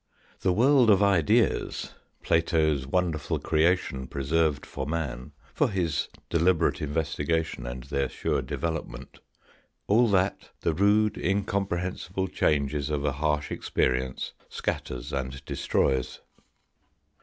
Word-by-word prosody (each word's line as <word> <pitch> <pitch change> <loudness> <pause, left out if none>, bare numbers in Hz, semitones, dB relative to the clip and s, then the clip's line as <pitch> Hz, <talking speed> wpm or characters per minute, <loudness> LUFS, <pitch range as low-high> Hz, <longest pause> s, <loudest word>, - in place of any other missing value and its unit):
The 95 - +1
world 125 +4 +5
of 100 -1 +5
ideas, 90 -7 +2 0.3
Plato's 80 -4 +2
wonderful 80 -1 0
creation 80 -5 +1
preserved 75 +2 0
for 70 -1 -5
man, 75 -6 -3 0.2
for - - +2
his 85 -7 -1 0.2
deliberate 85 +1 +2
investigation 80 -2 -1
and 60 0 -6
their 70 +1 -1
sure - - -1
development, 80 -7 -5 0.7
all 115 +4 +4
that 95 0 +1
the 85 - +1
rude 105 +4 +3
incom 100 0 0
prehensible 90 +1 -3
changes 70 -1 +1
of 75 -1 -1
a 70 - +2
harsh 75 +1 -1
experience 65 0 -1 0.2
scatters 65 +3 -4
and 65 0 -4
destroys. 65 -2 0
80 Hz, 110 wpm, -27 LUFS, 70-90 Hz, 0.7 s, world